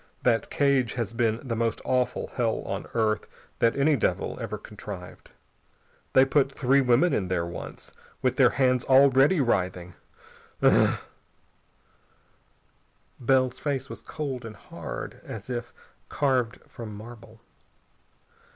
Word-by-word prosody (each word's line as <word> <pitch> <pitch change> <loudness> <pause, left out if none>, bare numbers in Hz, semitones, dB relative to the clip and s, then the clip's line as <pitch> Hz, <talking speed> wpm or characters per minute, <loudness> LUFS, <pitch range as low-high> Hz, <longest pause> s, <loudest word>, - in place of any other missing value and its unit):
That 115 -2 +2
cage 135 -5 +2
has 115 -3 -3
been 115 +2 0
the 115 - -1
most 115 -1 0
awful 125 -1 0
hell 115 -3 0
on - - -4
earth 110 -2 +1 0.3
that 115 - +3
any 145 +2 +3
devil 95 -6 -1
ever 110 -2 -4
contrived. 100 -3 -10 0.8
They 130 - +7
put 135 0 +2
three 135 +1 +3
women 130 +7 +3
in 95 - 0
there 90 -2 0
once, 85 - -8 0.3
with 130 -1 +1
their 130 -3 +6
hands 130 -2 +2
already 135 +5 +5
writhing.... 90 -7 -1 0.7
Ugh!..." - - +5 2.2
Bell's 130 0 +2
face 140 -2 -2
was - - -8
cold 135 -5 -5
and 110 -2 -8
hard - - -8
is 110 +3 -7
if 120 -1 -4 0.4
carved 130 -5 0
from 110 -3 -8
marble. 110 +1 -12
120 Hz, 125 wpm, -26 LUFS, 110-135 Hz, 2.2 s, They